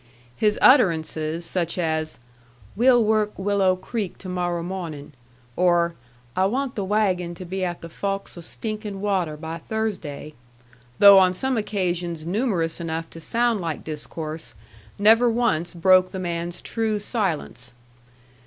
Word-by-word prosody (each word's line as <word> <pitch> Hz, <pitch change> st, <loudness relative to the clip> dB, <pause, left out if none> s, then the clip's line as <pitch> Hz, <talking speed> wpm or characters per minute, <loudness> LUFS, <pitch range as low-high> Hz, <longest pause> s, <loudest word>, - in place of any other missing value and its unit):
His 210 Hz, -, +1 dB
utterances, 165 Hz, -, +3 dB
such 170 Hz, 0 st, -2 dB
as, 160 Hz, -2 st, -1 dB, 0.6 s
"We'll 245 Hz, +1 st, +5 dB
work 215 Hz, -1 st, +1 dB
Willo' 195 Hz, -1 st, +2 dB
Creek 205 Hz, -1 st, -4 dB
to 190 Hz, -, -10 dB
morro' 175 Hz, -2 st, -2 dB
mawnin'," 165 Hz, -5 st, -6 dB, 0.4 s
or, 175 Hz, -1 st, +3 dB, 0.4 s
"I 190 Hz, +1 st, +3 dB
want 260 Hz, +4 st, -2 dB
the 200 Hz, -, -3 dB
wagon 185 Hz, -4 st, 0 dB
to 185 Hz, -, -8 dB
be 190 Hz, +2 st, -3 dB
at 175 Hz, -1 st, -3 dB
the 165 Hz, -, -7 dB
fawks 195 Hz, +4 st, -4 dB
o' 175 Hz, -, -9 dB
Stinkin' 210 Hz, +2 st, -5 dB
Water 185 Hz, -6 st, -1 dB
by 160 Hz, +2 st, -6 dB
Thursday," 175 Hz, -9 st, -4 dB, 0.6 s
though 200 Hz, -1 st, +9 dB
on 185 Hz, -1 st, +3 dB
some 265 Hz, +6 st, -1 dB
occasions 175 Hz, -6 st, -2 dB
numerous 180 Hz, -4 st, -1 dB
enough 165 Hz, 0 st, -4 dB
to 165 Hz, -, -9 dB
sound 230 Hz, +3 st, +1 dB
like 165 Hz, -3 st, -4 dB
discourse, 155 Hz, -2 st, -6 dB, 0.4 s
never 225 Hz, +4 st, +5 dB
once 220 Hz, -8 st, 0 dB
broke 185 Hz, +1 st, +5 dB
the 190 Hz, -, -6 dB
man's 175 Hz, -1 st, -4 dB
true 220 Hz, -2 st, -1 dB
silence. 190 Hz, -, -3 dB
185 Hz, 140 wpm, -23 LUFS, 165-210 Hz, 0.6 s, though